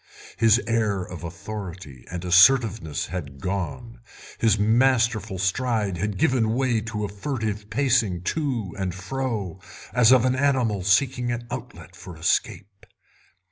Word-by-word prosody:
His 115 +1 +5
air 110 -5 0
of 90 -1 -9
authority 85 - -8
and 90 0 -5
assertiveness 90 - +4
had 75 -6 -7
gone, 100 - -4 0.4
his 110 -2 +3
masterful 115 -2 +2
stride 100 0 0
had 100 +2 -2
given 115 0 +2
way 125 -4 +1
to 105 -1 -4
a - - -3
furtive 105 -1 -4
pacing 115 -8 +1
to 120 - -2
and 95 -2 -2
fro, 100 -3 -4 0.3
as 125 -1 +5
of 130 -2 +5
an 130 - +2
animal 130 -7 +1
seeking 120 +5 +2
an 120 0 -4
outlet - - -8
for 90 -3 -11
escape. 100 +3 -2
105 Hz, 135 wpm, -24 LUFS, 95-120 Hz, 0.4 s, His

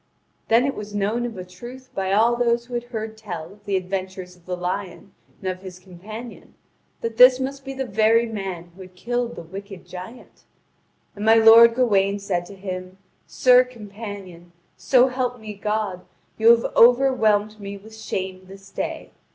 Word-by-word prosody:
Then 230 +3 +4
it 280 - 0
was 210 0 -8
known 215 +4 0
of 225 -4 -9
a 185 - -6
truth 240 +8 -12
by 190 0 -2
all 225 +4 +4
those 235 0 +1
who 245 - -12
had 240 0 -2
heard 220 -2 -6
tell 180 -5 -7
of 205 0 -23
the 200 -2 0
adventures 185 -1 -5
of 175 0 -26
the 180 -1 -3
lion 185 +2 -5 0.3
and 190 - -6
of 185 0 -9
his 185 -2 -9
companion 205 +6 -11 0.5
that 230 -1 -4
this 250 +1 +8
must 270 +1 -4
be 270 0 -7
the 265 0 -3
very 220 +1 +3
man 190 -6 -6
who 190 - -14
had 185 0 -13
killed 240 +4 -3
the - - -8
wicked 195 +2 -10
giant. 185 +7 -11 0.7
And 205 - -6
my 220 +1 +6
lord 225 +1 +8
Gawain 200 -5 +2
said 180 -3 -3
to 200 - -11
him: 185 -1 -7 0.3
"Sir 250 0 +5
companion, 205 -7 -10 0.2
so 255 0 +3
help 250 -1 -2
me 215 -1 -8
God, 205 -2 -3 0.3
you 225 +1 +4
have 235 0 +4
overwhelmed 225 -4 +4
me 200 0 -7
with 220 +2 -14
shame 190 -3 -5
this 195 +1 -14
day. - - -5
210 Hz, 180 wpm, -23 LUFS, 190-235 Hz, 0.7 s, this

